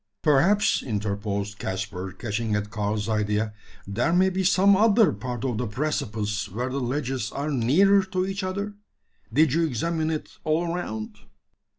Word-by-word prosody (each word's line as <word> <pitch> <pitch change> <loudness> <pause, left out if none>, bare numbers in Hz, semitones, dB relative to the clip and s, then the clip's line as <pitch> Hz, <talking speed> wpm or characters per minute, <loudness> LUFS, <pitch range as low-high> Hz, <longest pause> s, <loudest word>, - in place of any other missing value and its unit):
"Perhaps," 170 +8 +4
interposed 105 -2 -3
Caspar, 95 -1 -4
catching 110 +2 -2
at 105 0 -2
Karl's 105 0 -2
idea, 105 0 0 0.3
"there 110 +11 0
may 185 +2 +4
be 190 +1 -1
some 195 +2 +5
other 220 +1 +5
part 120 +4 -5
of 120 -5 -1
the 125 - -1
precipice 105 -5 -2
where 120 +7 -3
the 135 +2 -2
ledges 130 +1 -2
are 145 +2 -3
nearer 165 +11 +4
to 185 -1 -1
each 195 +1 -3
other? 200 +2 -3 0.6
Did 155 -2 +4
you 165 +1 +2
examine 160 +3 -1
it 155 -1 -5
all 165 +2 0
around?" 110 -12 -5
125 Hz, 155 wpm, -25 LUFS, 105-170 Hz, 0.6 s, some